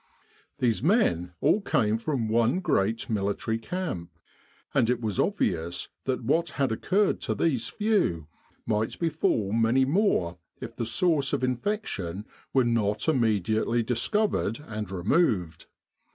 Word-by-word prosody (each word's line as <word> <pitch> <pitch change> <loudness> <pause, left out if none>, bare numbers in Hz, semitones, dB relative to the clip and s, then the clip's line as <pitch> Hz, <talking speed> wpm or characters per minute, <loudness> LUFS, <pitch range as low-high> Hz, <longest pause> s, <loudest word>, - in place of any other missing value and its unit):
These 115 -3 +1
men 125 - +2
all 210 - +3
came 110 - +1
from 125 -3 -1
one 115 +8 +2
great 110 - 0
military 105 +1 -1
camp, 135 - -4 0.6
and 115 - +3
it 125 -1 +1
was 110 -5 -2
obvious 85 +2 0 0.2
that 130 -2 -1
what 160 +7 +1
had 135 -4 +1
occurred 195 - +1
to - - -1
these 135 -9 0
few 205 - 0 0.4
might 110 0 -1
befall 150 - 0
many 115 +4 +3
more 135 - +1 0.2
if - - -8
the 115 - -3
source 150 - +1
of - - 0
infection 120 - -2 0.3
were 130 - +3
not 110 -1 0
immediately 115 - +1
dis 120 +2 0
covered 210 - 0
and 105 -2 -5
removed. 95 - 0
115 Hz, 135 wpm, -27 LUFS, 105-155 Hz, 0.6 s, all